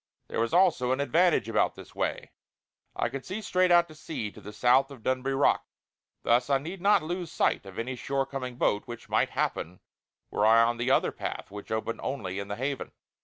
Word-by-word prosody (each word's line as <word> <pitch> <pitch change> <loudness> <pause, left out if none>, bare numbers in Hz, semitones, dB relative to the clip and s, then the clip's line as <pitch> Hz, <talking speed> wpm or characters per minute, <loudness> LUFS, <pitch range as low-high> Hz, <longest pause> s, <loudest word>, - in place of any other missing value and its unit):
There - - -3
was 115 0 +1
also 170 -9 +3
an 130 - +1
advantage 165 +6 +3
about - - +1
this - - -12
way; - - -3 0.6
I - - 0
could 135 -1 -6
see 190 +4 -5
straight 185 -3 +2
out 175 0 +6
to 155 - -13
sea 155 -8 -5
to - - -14
the 105 - -9
south 125 +5 +3
of 135 -5 -12
Dunbuy 130 +1 0
Rock. - - +3 0.6
Thus 125 +3 +3
I 140 - +4
need 170 +7 -7
not 200 -3 +4
lose 175 +1 -4
sight 100 - +1
of 95 - -11
any 130 +3 -3
shore 135 +2 -1
coming 130 -2 -5
boat; 105 -3 0
which 120 -1 -9
might - - +2
happen 90 +3 -2 0.5
were 105 - 0
I 115 +1 +7
on 120 +1 +1
the 120 +2 -1
other - - +3
path - - -6
which 105 +1 -9
opened 110 +1 -2
only 100 -8 -3
in 100 - -5
the 100 - -4
Haven. 135 +4 -3
130 Hz, 215 wpm, -28 LUFS, 115-155 Hz, 0.6 s, I